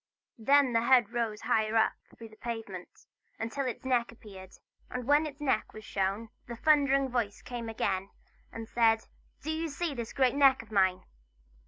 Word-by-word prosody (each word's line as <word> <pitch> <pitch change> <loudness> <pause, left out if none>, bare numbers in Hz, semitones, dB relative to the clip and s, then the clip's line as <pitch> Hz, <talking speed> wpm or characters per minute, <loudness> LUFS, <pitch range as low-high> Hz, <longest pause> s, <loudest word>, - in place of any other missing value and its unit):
Then 275 +2 +4
the 230 - +3
head 235 -3 +4
rose 225 -3 -2
higher 220 0 +1
up 225 - +4 0.2
through 225 -1 -10
the 215 - -16
pavement, 215 -6 -7 0.3
until 245 +5 -3
its 250 - -5
neck 245 -3 +1
appeared. 195 -5 -13 0.4
And 250 -1 -5
when 295 +3 +4
its 290 0 -10
neck 265 -7 0
was 215 -1 -10
shown, 200 +3 -2 0.2
the 235 - -6
thundering 275 0 +3
voice 235 -5 -2
came 240 -2 -6
again 195 -3 -2 0.4
and 225 -1 -7
said: 225 -1 +2 0.4
"Do 315 - -2
you 320 +1 -2
see 310 +2 -3
this 235 -4 -5
great 260 -2 +2
neck 275 -4 +4
of 220 - -20
mine?" 190 -3 +2
235 Hz, 175 wpm, -30 LUFS, 215-270 Hz, 0.4 s, Then